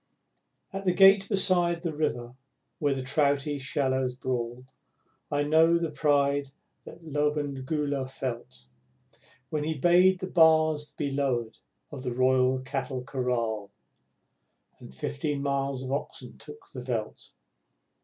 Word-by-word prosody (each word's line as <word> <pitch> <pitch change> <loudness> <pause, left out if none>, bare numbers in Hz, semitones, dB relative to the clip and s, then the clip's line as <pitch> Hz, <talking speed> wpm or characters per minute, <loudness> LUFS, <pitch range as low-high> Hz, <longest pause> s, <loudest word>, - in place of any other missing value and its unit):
At 195 0 -4
the 180 -2 +2
gate 195 +1 +6
beside 175 -4 +2
the 165 -3 -2
river 125 -6 -2 0.5
where 145 -2 +1
the 130 - -4
trouty 145 +1 +1
shallows 130 -2 -1
brawl, 125 -1 -4 0.7
I 145 0 +1
know 160 +3 +4
the 165 -2 -2
pride 145 -2 +1 0.4
that 170 - -12
Lobengula 145 -2 -1
felt, 115 - -6 0.9
When 150 -1 -1
he 160 +1 -2
bade 180 +5 +5
the 185 - -3
bars 160 -4 +3
be 140 -1 -3
lowered 130 -5 -1 0.3
of 140 -3 -7
the 125 -2 -4
Royal 130 0 +3
Cattle 130 -1 -4
Kraal, 120 -5 -2 1.1
And - - -12
fifteen 65 - -3
miles 140 -1 -1
of 130 - -5
oxen 140 - -4
took 445 - -13
the - - -7
veldt. - - -5
140 Hz, 125 wpm, -27 LUFS, 130-155 Hz, 1.1 s, gate